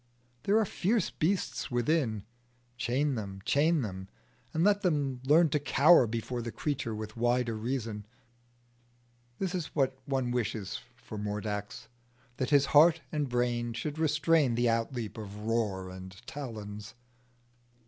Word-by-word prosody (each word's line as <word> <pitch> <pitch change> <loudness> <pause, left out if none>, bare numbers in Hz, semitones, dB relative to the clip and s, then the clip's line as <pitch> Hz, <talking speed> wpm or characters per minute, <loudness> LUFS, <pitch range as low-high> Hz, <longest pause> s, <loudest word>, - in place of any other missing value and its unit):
There 205 +2 +4
are 220 - +3
fierce 205 +2 0
beasts 180 +4 -1
within: 120 -4 +1 0.5
chain 130 +5 0
them, 100 -5 -5
chain 155 +1 +3
them, 95 -2 -6 0.4
and 160 - +1
let 205 +1 +4
them 140 -7 0
learn 160 +3 +6
to 150 - +1
cower 145 -1 +5
before 115 +2 -3
the 115 0 -5
creature 130 -6 -2
with 110 0 -6
wider 120 0 +1
reason. 110 -2 -3 1.3
This 190 -1 -2
is 175 -4 -2
what 135 -3 +2
one 130 -3 0
wishes 110 -4 -2 0.2
for 105 - -8
Mordax 105 +1 -4 0.5
that 130 - -1
his 140 -2 +5
heart 160 +2 +7
and 150 -3 -1
brain 120 -1 0
should 145 +6 -4
restrain 155 -4 +3
the 120 +1 +2
outleap 115 -1 -2
of 105 0 -8
roar 105 -5 -1
and 95 +1 -10
talons. 110 -6 -7
120 Hz, 140 wpm, -30 LUFS, 110-150 Hz, 1.3 s, heart